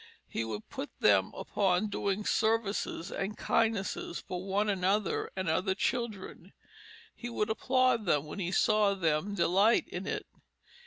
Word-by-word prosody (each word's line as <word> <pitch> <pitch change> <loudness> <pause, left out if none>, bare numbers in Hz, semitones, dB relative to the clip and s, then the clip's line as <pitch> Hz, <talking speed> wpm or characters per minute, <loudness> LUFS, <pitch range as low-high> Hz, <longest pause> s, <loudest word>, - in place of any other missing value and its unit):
He 115 - -2
would 110 -1 -5
put 285 +1 -6
them - - +4
upon 195 +1 0
doing 200 0 -2
services 220 -5 0
and 200 +2 -3
kindnesses 220 -6 0
for 180 -1 -6
one 200 +2 0
another 195 +1 0
and 190 -1 -3
other 185 +4 +1
children. 205 -6 -3 0.6
He 240 - -7
would 220 -2 -1
applaud 255 -1 +2
them 150 -3 +2
when 150 - -7
he 180 -2 -2
saw 210 0 +3
them 170 +2 0
delight 195 +5 +3
in - - -6
it. - - -3
200 Hz, 145 wpm, -31 LUFS, 185-220 Hz, 0.6 s, them